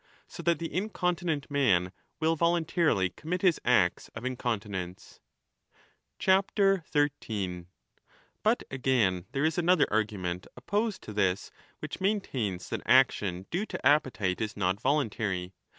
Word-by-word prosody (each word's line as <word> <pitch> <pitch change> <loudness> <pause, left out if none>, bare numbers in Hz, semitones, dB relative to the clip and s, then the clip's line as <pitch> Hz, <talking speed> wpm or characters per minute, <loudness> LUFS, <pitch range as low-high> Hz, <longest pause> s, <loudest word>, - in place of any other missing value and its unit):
So - - -9
that 170 -2 +2
the 165 - -5
15 185 +4 -1
incontinent 175 -7 -2
man 95 -11 +2 0.3
will 160 +1 +2
voluntarily 165 - +2
commit 170 - -4
his 180 -4 +3
acts 90 -8 +2
of 115 +2 -6
in 130 0 -1
continence. 100 -7 -4 1.0
13 145 - +1 0.7
But, - - +2
again, 120 -9 +1
there 140 +2 +1
is 160 +2 +1
another 175 -1 +4
argument 100 -4 -1
opposed 210 0 -1
to 105 - -8
this, 95 -2 0 0.3
which - - -6
maintains 130 - -1
that - - -3
action 105 -8 +3
due 195 +6 -1
to - - -6
appetite 120 -11 +2
is 110 -1 -3
not 95 +1 0
voluntary. 105 -10 -1
130 Hz, 130 wpm, -29 LUFS, -, 1.0 s, another